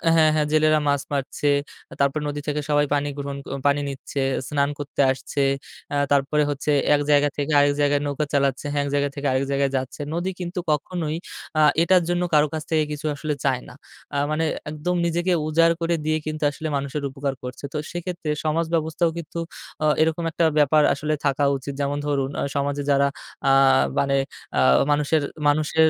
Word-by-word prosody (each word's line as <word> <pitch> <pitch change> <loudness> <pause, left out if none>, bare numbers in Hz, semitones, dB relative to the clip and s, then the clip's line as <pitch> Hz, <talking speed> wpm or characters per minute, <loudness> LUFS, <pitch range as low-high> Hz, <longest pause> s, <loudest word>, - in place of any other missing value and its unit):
হ্যাঁ, 155 -1 +5
হ্যাঁ, 150 -1 +1
জেলেরা 155 0 +4
মাছ 140 -1 +2
মারছে, 140 +1 -1 0.5
তারপরে 140 +2 +1
নদী 145 0 -4
থেকে 150 0 -1
সবাই 145 0 +3
পানি 145 0 +1
গ্রহণ 140 -1 -4 0.3
পানি 145 0 +2
নিচ্ছে, 135 +1 -5 0.3
স্নান 140 -1 +1
করতে 145 0 -2
আসছে, 135 +2 -3 0.5
আ - - 0 0.2
তারপরে 145 +2 +3
হচ্ছে 145 +1 -1 0.2
এক 145 - 0
জায়গা 145 0 +4
থেকে 145 +1 -1
আরেক 145 0 +4
জায়গায় 145 0 +2
নৌকা 145 +1 -1
চালাচ্ছে, 140 -1 +1
হ্যাঁ, 145 -1 +1
এক - - -3
জায়গা 145 0 +1
থেকে 145 0 -2
আরেক 130 +1 +1
জায়গায় 140 0 +1
যাচ্ছে। 130 +3 -5
নদী 175 +3 -1
কিন্তু 180 0 -4
কখনোই 155 +1 -2 0.4
আ - - +5 0.2
এটার 180 +1 +4
জন্য 175 0 +1
কারো 150 0 +5
কাছ 155 -1 -3
থেকে 155 -1 +3
কিছু 150 +1 -5
আসলে 150 +1 -2
চায় 130 -2 +1
না। - - -12 0.4
আ - - +1
মানে 160 +1 +1 0.2
একদম 155 +4 -2
নিজেকে 175 +2 0 0.2
উজাড় 165 +2 +4
করে 170 0 +1
দিয়ে 155 0 +2
কিন্তু 155 0 -4
আসলে 155 +2 -5
মানুষের 140 +1 -4
উপকার 135 0 -3
করছে। 125 +2 -7
তো - - -2
সেক্ষেত্রে 175 -2 -5 0.2
সমাজ 160 +2 +1
ব্যবস্থাও 160 +1 +1
কিন্তু 170 0 -6 0.4
অ - - +3 0.2
এরকম 160 +1 +1
একটা 165 - +1
ব্যাপার 150 +1 +5
আসলে 150 +2 -2
থাকা 140 0 +1
উচিত 140 +1 -6
যেমন 140 +1 -1
ধরুন 140 -2 0
অ - - 0
সমাজে 145 0 -1
যারা 140 0 +4 0.4
আ - - +5 0.5
মানে 140 0 +2 0.4
আ - - +4 0.3
মানুষের, 150 +1 +2 0.3
মানুষের 155 +2 +3
145 Hz, 185 wpm, -23 LUFS, 140-155 Hz, 0.5 s, হ্যাঁ